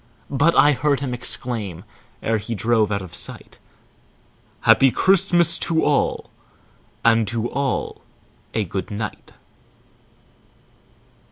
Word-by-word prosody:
But 145 +5 +2
I 145 - +6
heard 145 0 0
him 130 -3 -3
exclaim, 110 -7 -3 0.4
ere 110 -1 0
he 115 +3 -5
drove 110 +1 +1
out 100 -1 -2
of 90 -2 -11
sight, - - -8 1.0
"Happy 135 - +5
Christmas 175 +1 +4
to 160 -1 +1
all, - - 0 0.7
and 115 -2 +3
to 115 +2 -2
all 135 -1 -3 0.5
a 110 - +1
good 95 +1 -5
night." 105 0 -6
120 Hz, 110 wpm, -21 LUFS, 105-145 Hz, 1.0 s, I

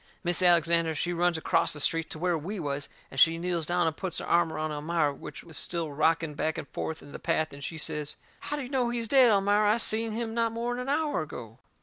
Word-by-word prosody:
Mis' 175 0 +5
Alexander, 170 -2 +4
she 175 +4 -1
runs 175 0 +1
acrost 160 - +1
the - - -6
street 165 +2 +1
to - - -6
where 175 +1 0
we 185 +7 -5
was, 145 -3 -3 0.2
and 135 - -4
she 165 +2 +6
kneels 170 -2 -2
down 175 0 +1
and 160 -1 0
puts 185 -1 -4
her - - -3
arm 170 -1 +2
around 155 0 -3
Elmira, 150 0 0
which - - -10
was 160 -3 -7
still 165 -3 -3
rocking 160 +1 +1
back 160 +2 -2
and - - -6
forth 160 - -5
in 145 - -13
the - - -8
path, 155 -1 -1
and 140 0 -10
she 160 - -5
says: 150 -1 -4 0.2
"How 295 - -4
do 290 - -4
you 250 - -8
know 255 -3 0
he's 235 -1 -3
dead, 260 -1 +6
Elmira? 205 +1 +3
I - - -1
seen 225 -1 +1
him 225 0 -3
not 230 -1 0
more'n 240 +1 -2
an 250 +2 -4
hour 295 - 0
ago." 115 -6 -9
170 Hz, 250 wpm, -28 LUFS, 155-215 Hz, 0.2 s, she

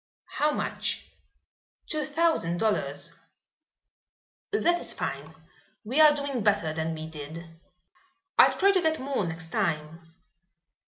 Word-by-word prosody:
"How 300 - +3
much?" - - -3 0.7
"Two 310 -2 -2
thousand 300 - +1
dollars." 220 +2 -1 1.4
"That 345 -4 +2
is - - -2
fine. - - -4 0.5
We 255 +8 +2
are 300 -1 +8
doing 280 -4 -2
better 200 -6 +2
than 160 0 -2
we 155 0 -6
did." 160 +1 -8 0.9
"I'll - - +6
try 395 0 +5
to 380 -2 +2
get 315 -1 +1
more 265 -4 -1
next 165 0 -6
time." 165 -4 -3
210 Hz, 120 wpm, -27 LUFS, -, 1.4 s, are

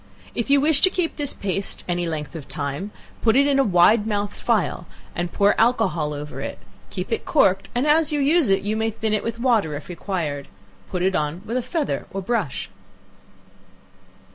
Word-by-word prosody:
If 235 +2 -3
you 280 0 +5
wish 290 0 +3
to 375 - +7
keep 360 -3 -1
this 290 -2 -1
paste 195 0 -2
any 175 -1 -1
length 155 -1 -4
of 155 -4 -7
time, 145 +5 -4 0.3
put 225 0 +3
it 280 +1 +5
in 280 -1 +2
a - - +5
wide 205 +2 +4
mouthed 205 -1 -1
phial, 210 -6 -1 0.3
and 175 0 -3
pour 200 0 +3
alcohol 185 -10 +2
over 150 0 -6
it; - - -5 0.3
keep - - -5
it 455 - -1
corked, 195 - +2
and 245 +3 +1
as 310 +1 +3
you 295 - 0
use 290 - +3
it, 195 0 +2
you 210 +2 -1
may 220 0 0
thin 220 0 -2
it 215 - 0
with 230 0 -3
water 230 - +1
if 145 - -8
required; 165 -6 -3 0.4
put 180 -1 -2
it 190 +1 +2
on 155 +4 -2
with 230 +2 -4
a 255 - +1
feather 310 +3 -2
or 195 - -4
brush. 195 - -2
205 Hz, 195 wpm, -23 LUFS, 175-255 Hz, 0.4 s, to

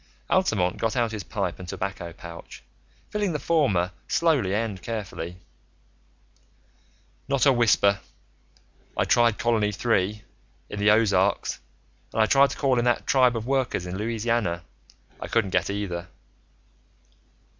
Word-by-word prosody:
Altamont 105 - +2
got 115 +1 -1
out 120 -3 +1
his 110 -2 -4
pipe 95 -3 -3
and 90 - -8
tobacco 95 -1 -4
pouch, 85 0 -11 0.5
filling 205 -4 -1
the - - 0
former 100 - +1 0.2
slowly 150 - +2
and 105 -3 -2
carefully. 100 -6 -5 1.9
"Not 140 -3 +2
a 135 - +6
whisper. 100 -4 +3 1.0
I - - +2
tried 120 -2 +3
Colony 115 -3 +1
Three, 105 -1 0 0.5
in 105 - -5
the 105 +1 +4
Ozarks, 100 -3 +2 0.5
and 110 - +2
I - - +4
tried 140 +4 +5
to - - -6
call 130 -3 +2
in 120 - 0
that 120 -1 +1
tribe 125 -3 +4
of 110 - -5
workers 130 -8 0
in 90 +1 -5
Louisiana. 110 -4 -1 0.6
I - - -6
couldn't 110 -5 +1
get - - +1
either." 95 -4 -3
110 Hz, 135 wpm, -25 LUFS, 95-120 Hz, 1.9 s, a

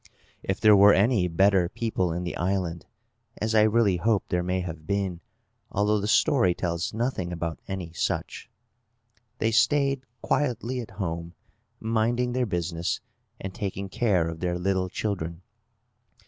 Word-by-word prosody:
If 95 - -2
there 105 -1 +7
were 100 +1 +8
any 100 -2 +3
better 95 +1 +3
people 100 -5 -1
in 85 +2 -3
the 90 - -4
island 90 -2 -2 0.5
(as 110 +1 -1
I 110 - +6
really 110 -3 +3
hope 105 +2 +1
there 90 -1 +1
may 90 +1 -1
have 80 -3 -7
been, 95 -3 -1 0.5
although 105 +1 +2
the 100 - -2
story 110 - +3
tells 85 -1 -2
nothing 110 -6 -2
about 85 -2 -4
any 95 -4 -5
such), - - -3 0.9
they 110 - +1
stayed 140 +3 +3 0.2
quietly 125 -2 0
at 115 - -6
home, 85 -3 -4 0.4
minding 115 +2 0
their 125 0 0
business, 85 -2 -2 0.4
and 95 -1 -6
taking 100 -3 -4
care 95 -6 +1
of 80 0 -5
their 90 0 -1
little 95 0 0
children. 90 -4 -3
95 Hz, 150 wpm, -26 LUFS, 90-110 Hz, 0.9 s, were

